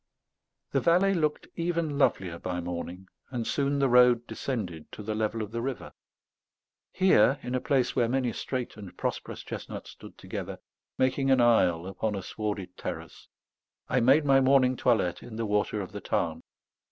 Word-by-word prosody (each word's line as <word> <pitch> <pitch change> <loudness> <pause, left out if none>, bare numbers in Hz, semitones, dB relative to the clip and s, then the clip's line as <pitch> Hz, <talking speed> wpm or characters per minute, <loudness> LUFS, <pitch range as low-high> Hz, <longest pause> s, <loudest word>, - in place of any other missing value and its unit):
The - - +2
valley 180 +4 +4
looked 155 -4 0
even 170 -4 -1
lovelier 90 -10 +1
by 90 -1 -3
morning; 90 +2 -5 0.2
and 120 -3 -3
soon 140 +2 0
the 140 -1 +3
road 125 -1 +5
descended 95 - -5
to 105 - -7
the 110 +1 -2
level 110 +1 -1
of 105 - -8
the 115 0 -3
river. 130 0 -5 1.0
Here, 140 - +4
in 125 - -4
a 130 - 0
place 135 -4 +1
where 120 -3 +2
many 125 -2 0
straight 125 0 -4
and 100 -4 -10
prosperous - - -4
chestnuts - - -7
stood - - -13
together, - - -6 0.4
making 135 +1 +1
an 130 -1 +5
aisle 90 -8 +4
upon 100 +3 -2
a 95 - -4
swarded 100 -3 -4
terrace, - - -7 0.6
I - - +3
made 135 +6 +5
my 135 -1 +5
morning 130 -1 +4
toilette 110 -9 +1
in 115 - -9
the 115 0 -2
water 105 0 0
of 95 - -7
the - - -7
Tarn. - - -1
120 Hz, 170 wpm, -28 LUFS, 105-135 Hz, 1.0 s, road